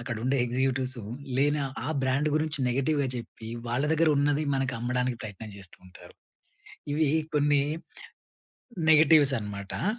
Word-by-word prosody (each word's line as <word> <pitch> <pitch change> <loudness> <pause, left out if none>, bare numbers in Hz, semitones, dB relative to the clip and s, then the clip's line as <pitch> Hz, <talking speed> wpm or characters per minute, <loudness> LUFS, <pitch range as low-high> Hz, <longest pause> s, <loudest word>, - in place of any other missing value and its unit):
అక్కడుండే 120 +2 -1
ఎగ్జిక్యూటివ్సు 130 -1 -1 0.3
లేని 145 +2 +2 0.3
ఆ - - -2
బ్రాండ్ 135 +3 +1
గురించి 155 -1 0
నెగెటివ్‌గా 140 +3 +1
చెప్పి 115 -1 -8 0.2
వాళ్ళ 120 +4 0
దగ్గరున్నది 150 -2 +2
మనకమ్మడానికి 125 -1 -1
ప్రయత్నం 110 0 -8
చేస్తూ 95 -3 -8
ఉంటారు. - - -15 0.8
ఇవి 155 -2 +2 0.2
కొన్ని 145 -1 +3 1.3
నెగటివ్స్ 150 -3 +6
అనమాట. 100 - -5
135 Hz, 110 wpm, -27 LUFS, 120-145 Hz, 1.3 s, నెగటివ్స్